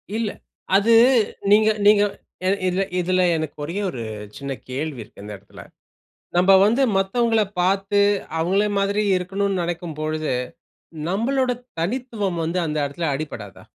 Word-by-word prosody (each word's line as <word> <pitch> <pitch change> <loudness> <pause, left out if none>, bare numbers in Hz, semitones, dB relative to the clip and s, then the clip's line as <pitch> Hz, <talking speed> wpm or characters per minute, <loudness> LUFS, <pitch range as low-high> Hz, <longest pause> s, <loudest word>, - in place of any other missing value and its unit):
இல்ல. 225 -1 -1 0.5
அது, 205 +4 +4 0.6
நீங்க 215 +1 +6 0.2
நீங்க 205 0 +6 0.4
என 195 +1 +2
இதுல 185 +2 0 0.2
இதுல, 185 +1 +1
எனக்கு 155 -2 -4
ஒரே 165 +5 -5
ஒரு 125 - -6 0.4
சின்ன 140 0 -5 0.2
கேள்வி 135 0 -4
இருக்கு, 100 - -16
இந்த 105 0 -7
எடத்துல. 100 +1 -14 0.8
நம்ப 185 +2 +5
வந்து 235 +6 +2 0.2
மத்தவங்கள 225 +3 +2 0.2
பாத்து, 195 +2 +2 0.4
அவுங்கள 190 +5 +2
மாதிரி 200 +2 +1
இருக்கணுன்னு 195 +1 -1
நினைக்கும் 170 -2 -4
பொழுது, 155 -1 -2 0.8
நம்மளோட 250 +7 0 0.3
தனித்துவம் 210 -2 -2
வந்து 170 +3 -1
அந்த 155 -1 -3
இடத்துல 150 +4 -3
அடிபடாதா? 120 - -7
185 Hz, 130 wpm, -22 LUFS, 155-205 Hz, 0.8 s, நீங்க